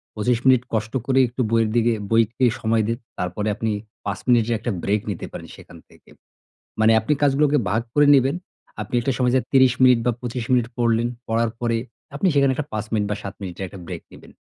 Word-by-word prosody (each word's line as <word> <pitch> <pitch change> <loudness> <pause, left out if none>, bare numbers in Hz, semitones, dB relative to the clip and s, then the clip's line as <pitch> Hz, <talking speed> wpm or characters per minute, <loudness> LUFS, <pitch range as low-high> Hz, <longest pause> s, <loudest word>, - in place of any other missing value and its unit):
২৫ 115 +2 +1
minute 130 -2 +5
কষ্ট 110 0 -2
করে 135 0 +2
একটু 120 +2 -4
বইয়ের 115 -1 +2
দিকে, 120 0 +3 0.2
বইকে 115 +3 +2
সময় 110 0 +1
দিন। 115 - -1 0.2
তারপরে 90 +4 -3
আপনি 110 -1 -2 0.3
৫ 100 -1 -3
মিনিটের 120 -2 +3
একটা 120 - -3
ব্রেক 105 +1 +1
নিতে - - -4
পারেন - - -8
সেখান - - -14
থেকে। - - -22 0.7
মানে 110 +1 +5
আপনি 110 +7 0
কাজগুলোকে 145 +1 +3
ভাগ 110 +4 +1
করে 145 0 +4
নিবেন। 135 +2 +2 0.5
আপনি 105 - -4
একটা 135 +3 0
সময় 125 -1 +2
যে 130 - +3
৩০ 130 -2 +5
মিনিট 125 -2 +6
বা 120 - +3
২৫ 120 -1 -4
মিনিট 120 -2 +3
পড়লেন। 115 -1 +1 0.2
পড়ার 115 0 +1
পরে 115 -1 0 0.4
আপনি 190 - +1
সেখানে 140 -2 +3
একটা 150 0 -4
৫ 105 0 -2
মিনিট 105 -2 +1
বা - - 0
৭ 100 - -6
মিনিটের 95 0 -5
একটা 95 0 -11
ব্রেক - - -7
নিবেন। - - -15
115 Hz, 205 wpm, -22 LUFS, 110-130 Hz, 0.7 s, মিনিট